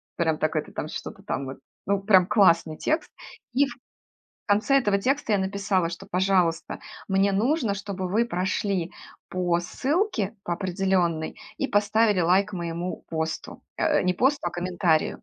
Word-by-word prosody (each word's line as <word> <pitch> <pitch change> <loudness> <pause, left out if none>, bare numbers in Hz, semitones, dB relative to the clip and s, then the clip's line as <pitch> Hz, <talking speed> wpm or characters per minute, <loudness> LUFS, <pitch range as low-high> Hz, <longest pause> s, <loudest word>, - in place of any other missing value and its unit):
прям 160 -2 +1
так, 155 +1 -1
это 155 - -2
там - - -4
что-то - - -7
там, 135 - -3
вот 135 0 -7 0.3
ну, 200 0 +1
прям 195 -3 +5
классный 170 -7 +4
текст. 310 - -1 0.4
И 275 +3 +4
в - - -8 0.7
конце 215 +7 +3
этого 205 -6 +2
текста 265 +3 0
я 205 - +4
написала, 190 -2 0
что, 175 +3 -8
пожалуйста, 180 -3 +1 0.3
мне 195 +1 +3
нужно, 230 +1 +1
чтобы 195 -2 -4
вы 220 +6 +2
прошли 185 -2 -1 0.4
по 175 -1 0
ссылке 260 - -1
по 175 - -2
определенной 180 -3 0 0.2
и - - -1
поставили 205 0 +3
лайк 190 +5 +3
моему 170 0 -4
посту, 160 -1 -4
э, - - +2
э, - - -1
не 180 0 +2
посту, 270 +8 +2
а 175 - -1
комментарию. 175 -2 0
190 Hz, 160 wpm, -25 LUFS, 175-205 Hz, 0.7 s, прям